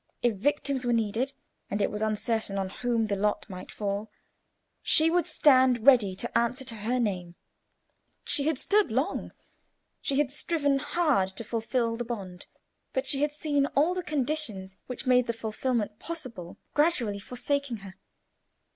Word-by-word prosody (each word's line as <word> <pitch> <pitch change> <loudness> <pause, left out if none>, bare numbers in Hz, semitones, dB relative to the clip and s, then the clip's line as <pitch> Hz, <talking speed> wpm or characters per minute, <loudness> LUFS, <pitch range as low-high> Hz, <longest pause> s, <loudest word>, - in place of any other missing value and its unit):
If 240 -2 +3
victims 275 +4 0
were 240 -1 +1
needed, 230 +4 0 0.4
and 205 - -1
it 200 - +1
was 210 - -4
uncertain 220 -1 0
on 190 -1 -1
whom 235 +2 0
the 205 -2 -1
lot 210 +1 0
might 185 -3 -8
fall, 205 +1 -3 0.7
she 320 +1 +4
would 350 0 +2
stand 255 -5 +4
ready 235 -9 +6
to 235 +5 -4
answer 235 +3 +1
to 235 -3 -2
her 235 +4 -1
name. 180 -6 -2 0.9
She 285 0 0
had 315 -3 +1
stood 410 +5 +2
long; 270 - -1 0.7
she 275 - 0
had 285 -2 +2
striven 290 -2 +1
hard 295 - +1
to - - -3
fulfil 230 +1 -1
the 240 - -2
bond, 195 -6 -6 0.5
but - - 0
she 275 -1 0
had 295 0 +2
seen 290 -2 0
all 310 +6 +4
the 365 - -2
conditions 275 - -2
which 250 - -6
made 250 -1 +4
the 230 - 0
fulfilment 225 -1 -2
possible 250 - -7 0.2
gradually 270 -10 +2
forsaking 250 +3 -2
her. 190 - -9
245 Hz, 160 wpm, -28 LUFS, 210-285 Hz, 0.9 s, ready